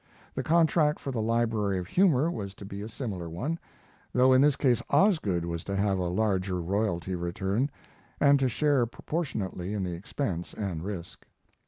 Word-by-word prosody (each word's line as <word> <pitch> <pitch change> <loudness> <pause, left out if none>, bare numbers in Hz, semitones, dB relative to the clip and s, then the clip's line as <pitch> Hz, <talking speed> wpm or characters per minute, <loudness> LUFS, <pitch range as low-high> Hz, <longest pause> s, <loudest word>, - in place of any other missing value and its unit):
The 130 - -2
contract 160 +1 +3
for 135 - -4
the 120 -4 -2
Library 110 -3 +1
of 90 - -3
Humor 165 - +3
was 100 - -5
to 100 - -10
be 100 0 -6
a 105 - -6
similar 100 -8 -5
one, 140 - -3 0.5
though 130 +1 +5
in 130 - +6
this 145 -1 +5
case 125 -5 +2
Osgood 105 - +3
was 85 -1 -4
to 100 - -2
have 100 -1 +1
a 90 - 0
larger 95 -2 0
royalty 95 0 -1
return, 95 +8 -1 0.5
and 140 -1 +5
to 130 -1 +2
share 140 -1 +2
proportionately 105 - -3
in 100 - -1
the 90 -1 -3
expense 90 - -4
and 90 -6 -3
risk. 95 -4 -7
105 Hz, 175 wpm, -28 LUFS, 95-135 Hz, 0.5 s, in